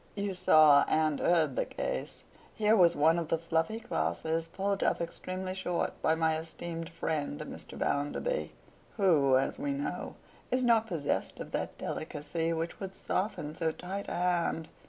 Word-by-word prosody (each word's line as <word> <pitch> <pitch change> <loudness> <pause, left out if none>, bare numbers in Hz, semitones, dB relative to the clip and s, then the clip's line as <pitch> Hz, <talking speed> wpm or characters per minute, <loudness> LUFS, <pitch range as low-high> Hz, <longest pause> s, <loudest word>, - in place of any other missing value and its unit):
You 200 -1 -2
saw 155 -5 +6
and 155 -2 +2
heard 160 -6 +3
the - - 0
case. - - -4 0.3
Here 215 0 +4
was 175 -4 +5
one 160 +3 +4
of 165 - -3
the 165 - +1
fluffy 165 +6 -1
classes 165 -8 -1
pulled 195 +3 -2
up - - +2
extremely 185 +2 -4
short 180 -2 -1
by 160 - +3
my 160 -1 +1
esteemed 165 +1 -6
friend 155 - -3
Mr. - - -8
Bounderby—who, 150 - 0
as 135 - -1
we 285 0 -1
know, 280 +1 -4 0.3
is 255 0 +1
not 230 -2 +4
possessed 165 -8 -2
of - - -7
that - - -3
delicacy 160 +1 -3
which 165 0 -3
would 190 -1 -6
soften 185 -6 -2
so 165 -1 0
tight 190 +5 -6
a - - -3
hand. 175 -2 0
170 Hz, 155 wpm, -31 LUFS, 160-190 Hz, 0.3 s, saw